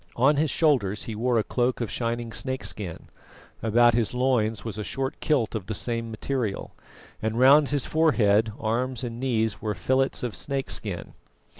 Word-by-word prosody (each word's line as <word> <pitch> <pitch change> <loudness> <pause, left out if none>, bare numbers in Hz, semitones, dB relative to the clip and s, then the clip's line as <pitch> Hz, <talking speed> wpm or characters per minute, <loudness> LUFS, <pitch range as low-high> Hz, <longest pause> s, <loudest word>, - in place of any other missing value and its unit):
On 140 +5 +4
his 155 +1 +2
shoulders 125 - +1
he 115 - -5
wore 120 +3 +1
a 110 - +2
cloak 125 +2 0
of 115 -5 -3
shining 115 -1 -2
snakeskin; 110 -7 -4 0.6
about 120 +2 +4
his 115 0 0
loins 115 -5 +1
was 110 -2 -5
a - - -2
short 135 +6 -3
kilt 135 -8 +1
of 105 -5 -4
the 110 - -3
same 115 +2 -2
material; 115 -2 -3 0.5
and 110 +1 -2
round 140 +3 +6
his 145 -2 0
forehead, 110 -9 +3
arms 120 +3 -1
and 120 -1 -5
knees 115 -4 0
were 105 -2 -2
fillets 130 +11 0
of 120 -3 -2
snakeskin. 130 -9 -3
120 Hz, 165 wpm, -26 LUFS, 110-130 Hz, 0.6 s, round